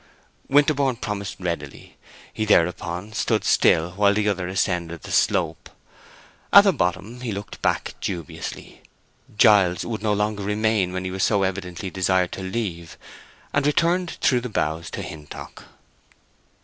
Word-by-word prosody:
Winterborne 145 Hz, -2 st, +3 dB
promised 105 Hz, -3 st, -4 dB
readily. 85 Hz, -6 st, -5 dB, 0.4 s
He 110 Hz, -, -2 dB
thereupon 90 Hz, +1 st, +1 dB
stood 105 Hz, -, 0 dB
still 85 Hz, +2 st, +3 dB
while 100 Hz, +2 st, +3 dB
the 105 Hz, 0 st, +1 dB
other 95 Hz, -3 st, -2 dB
ascended 90 Hz, -3 st, -2 dB
the -, -, -8 dB
slope. -, -, +1 dB, 0.8 s
At 200 Hz, -, +10 dB
the 195 Hz, -2 st, +3 dB
bottom 100 Hz, -, -2 dB
he 120 Hz, -3 st, -3 dB
looked 100 Hz, -1 st, -7 dB
back -, -, 0 dB
dubiously. 85 Hz, -6 st, -6 dB, 0.6 s
Giles 95 Hz, -7 st, +5 dB
would 110 Hz, -2 st, -4 dB
no 105 Hz, -1 st, +1 dB
longer 105 Hz, 0 st, -1 dB
remain 105 Hz, -2 st, +1 dB
when 95 Hz, 0 st, -4 dB
he 95 Hz, -, -3 dB
was 95 Hz, 0 st, -4 dB
so 100 Hz, -3 st, +2 dB
evidently 95 Hz, -1 st, -4 dB
desired 95 Hz, -1 st, +1 dB
to -, -, -6 dB
leave, 95 Hz, -4 st, -4 dB, 0.6 s
and 140 Hz, 0 st, +2 dB
returned 170 Hz, +4 st, +1 dB
through 125 Hz, -3 st, +3 dB
the 125 Hz, -, -5 dB
boughs 80 Hz, -5 st, -2 dB
to -, -, -5 dB
Hintock. 75 Hz, -2 st, -10 dB
100 Hz, 145 wpm, -23 LUFS, 90-110 Hz, 0.8 s, At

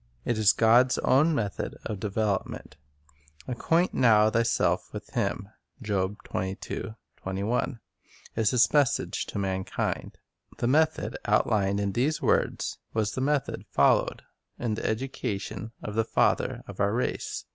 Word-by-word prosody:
It 120 Hz, -2 st, 0 dB
is 105 Hz, -2 st, +6 dB
God's 120 Hz, +3 st, +4 dB
own 150 Hz, +5 st, +3 dB
method 105 Hz, -6 st, -3 dB
of 105 Hz, -, -4 dB
development. 100 Hz, -5 st, -2 dB, 0.7 s
"Acquaint 165 Hz, +8 st, +1 dB
now 110 Hz, -3 st, +5 dB
thyself 115 Hz, +1 st, +1 dB
with -, -, -8 dB
Him," -, -, -2 dB, 0.4 s
3 100 Hz, -1 st, -1 dB, 2.2 s
is 110 Hz, -2 st, +2 dB
His 120 Hz, -3 st, +3 dB
message 145 Hz, -4 st, +1 dB
to -, -, -6 dB
mankind. 95 Hz, -1 st, -2 dB, 0.4 s
The -, -, -2 dB
method 155 Hz, +5 st, +2 dB
outlined 100 Hz, -1 st, +2 dB
in 100 Hz, -1 st, 0 dB
these 135 Hz, +9 st, 0 dB
words -, -, 0 dB, 0.2 s
was 110 Hz, -1 st, +1 dB
the 130 Hz, -, -3 dB
method 140 Hz, 0 st, 0 dB
followed -, -, +2 dB, 0.3 s
in 120 Hz, -3 st, -2 dB
the 110 Hz, -, -4 dB
education 110 Hz, -3 st, -3 dB
of 105 Hz, -, -5 dB
the 115 Hz, +1 st, +2 dB
father -, -, +1 dB
of -, -, -10 dB
our 100 Hz, 0 st, +2 dB
race. 125 Hz, -, -2 dB
110 Hz, 125 wpm, -27 LUFS, 100-125 Hz, 2.2 s, is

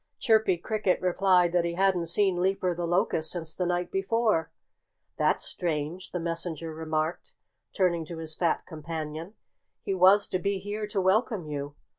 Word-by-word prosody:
Chirpy 220 Hz, -6 st, +3 dB
Cricket 200 Hz, +1 st, 0 dB
replied 180 Hz, -1 st, +3 dB
that 175 Hz, -1 st, +2 dB
he 170 Hz, 0 st, -2 dB
hadn't 185 Hz, -2 st, +2 dB
seen 185 Hz, 0 st, +2 dB
Leaper 185 Hz, -1 st, +1 dB
the 170 Hz, 0 st, -3 dB
Locust 175 Hz, -3 st, +1 dB
since 165 Hz, -3 st, -2 dB
the 180 Hz, -, -1 dB
night 175 Hz, 0 st, -1 dB
before. 195 Hz, -3 st, +1 dB, 0.7 s
"That's -, -, +2 dB
strange!" 165 Hz, +2 st, -3 dB
the 180 Hz, -, -3 dB
messenger 165 Hz, -1 st, -3 dB
remarked, 155 Hz, +1 st, -3 dB, 0.4 s
turning 175 Hz, -4 st, +1 dB
to 165 Hz, +1 st, -7 dB
his 160 Hz, -1 st, -6 dB
fat 170 Hz, -1 st, 0 dB
companion. 160 Hz, +2 st, -6 dB, 0.5 s
"He 195 Hz, -, -1 dB
was 190 Hz, +2 st, +5 dB
to 185 Hz, -, -1 dB
be 200 Hz, +1 st, 0 dB
here 205 Hz, +2 st, -4 dB
to 205 Hz, -1 st, -2 dB
welcome 195 Hz, 0 st, +1 dB
you." 145 Hz, -1 st, -5 dB
180 Hz, 160 wpm, -28 LUFS, 165-195 Hz, 0.7 s, was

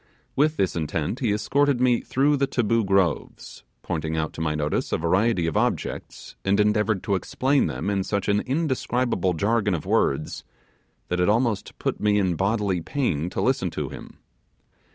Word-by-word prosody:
With 155 Hz, +2 st, +2 dB
this 95 Hz, -, 0 dB
intent, 80 Hz, -, -2 dB
he 120 Hz, -6 st, +1 dB
escorted 135 Hz, +6 st, +1 dB
me 125 Hz, -1 st, +3 dB
through 140 Hz, +3 st, +2 dB
the 140 Hz, 0 st, +1 dB
Taboo 115 Hz, -2 st, +1 dB
Groves, 95 Hz, -6 st, -1 dB, 0.2 s
pointing 80 Hz, -1 st, -3 dB
out 80 Hz, 0 st, -2 dB
to -, -, -6 dB
my 75 Hz, -1 st, 0 dB
notice 75 Hz, 0 st, -1 dB
a -, -, +1 dB
variety 90 Hz, +3 st, +1 dB
of 80 Hz, -, -2 dB
objects, -, -, -2 dB
and 100 Hz, +1 st, +2 dB
endeavoured 105 Hz, -1 st, +2 dB
to 100 Hz, -, -1 dB
explain 130 Hz, +8 st, +1 dB
them -, -, -4 dB
in 100 Hz, -1 st, 0 dB
such 100 Hz, +1 st, -2 dB
an 100 Hz, 0 st, +3 dB
indescribable 130 Hz, -, 0 dB
jargon 105 Hz, +1 st, +1 dB
of 80 Hz, -, -5 dB
words, 75 Hz, +3 st, 0 dB, 0.7 s
that 90 Hz, -, -1 dB
it 90 Hz, -, +3 dB
almost 115 Hz, -1 st, 0 dB
put -, -, -2 dB
me 105 Hz, -1 st, +2 dB
in 95 Hz, -3 st, +2 dB
bodily 100 Hz, -1 st, 0 dB
pain 90 Hz, -, -1 dB
to -, -, -3 dB
listen 130 Hz, -7 st, +1 dB
to -, -, -4 dB
him. -, -, -11 dB
105 Hz, 175 wpm, -24 LUFS, 90-120 Hz, 0.7 s, me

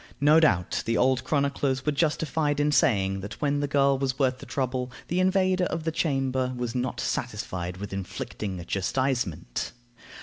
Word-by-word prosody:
No 150 Hz, +3 st, +6 dB
doubt 95 Hz, -, +2 dB
the 115 Hz, -, +2 dB
old 130 Hz, 0 st, +3 dB
chroniclers 140 Hz, -2 st, 0 dB
were 150 Hz, -, +2 dB
justified 150 Hz, 0 st, 0 dB
in 145 Hz, 0 st, +2 dB
saying 95 Hz, -8 st, +2 dB
that 100 Hz, +3 st, -7 dB
when 145 Hz, -1 st, +1 dB
the 145 Hz, -, 0 dB
girl 140 Hz, -1 st, +3 dB
was 135 Hz, -1 st, -1 dB
worth 130 Hz, -2 st, +1 dB
the -, -, -10 dB
trouble, 130 Hz, -1 st, -2 dB, 0.2 s
the 175 Hz, -, +1 dB
invader 185 Hz, 0 st, +3 dB
of 165 Hz, -, -3 dB
the 160 Hz, -, 0 dB
chamber 135 Hz, -5 st, 0 dB
was 120 Hz, -2 st, -3 dB
not 125 Hz, 0 st, -2 dB
satisfied 90 Hz, 0 st, -3 dB
with 100 Hz, +1 st, -6 dB
inflicting 95 Hz, 0 st, -5 dB
a 85 Hz, -, -7 dB
chastisement. 100 Hz, -, -1 dB
130 Hz, 170 wpm, -27 LUFS, 110-145 Hz, 0.2 s, No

